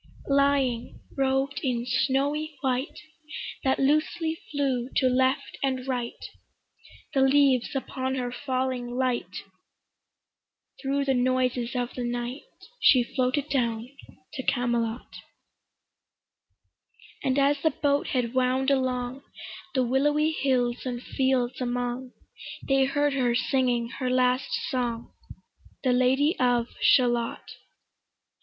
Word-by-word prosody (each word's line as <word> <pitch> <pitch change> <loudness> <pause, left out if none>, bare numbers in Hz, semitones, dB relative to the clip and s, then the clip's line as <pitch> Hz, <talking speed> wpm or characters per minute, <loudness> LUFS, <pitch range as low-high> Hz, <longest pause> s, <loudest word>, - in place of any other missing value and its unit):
Lying, 275 -4 +1 0.2
robed 270 0 0
in 245 -4 -1
snowy 285 +4 0
white 260 +2 -1 0.6
That 265 0 +2
loosely 310 +3 +1
flew 265 -4 -1
to 265 - +3
left 260 +1 +1
and 260 -1 -1
right 245 -3 -2 1.0
The 270 - +3
leaves 270 -2 +3
upon 265 0 -2
her 250 -2 -2
falling 255 -2 -2
light 255 -2 -1 1.4
Thro' 280 +1 0
the 275 -1 +1
noises 250 -1 0
of 245 0 -2
the 250 - -4
night 240 +2 -3 0.4
She 255 - +6
floated 260 +2 0
down 240 -1 -1 0.4
to - - -4
Camelot; 240 -2 -1 2.1
And 260 0 +1
as 280 0 +3
the 315 - +3
boat 285 0 0
head 245 -2 -1
wound 260 +1 +2
along 255 -1 -1 0.5
The 260 - +3
willowy 295 +5 +2
hills 250 -5 0
and 245 -2 -3
fields 260 -1 0
among, 245 +1 -3 0.5
They 270 -1 +4
heard 290 +1 +1
her 250 -3 +1
singing 245 -2 +1
her 255 -2 -1
last 255 +1 +2 0.2
song, 240 -3 -3 0.7
The 255 -2 +3
Lady 265 +6 +3
of 245 -2 +2
Shalott. 240 -2 +3
260 Hz, 110 wpm, -26 LUFS, 245-275 Hz, 2.1 s, She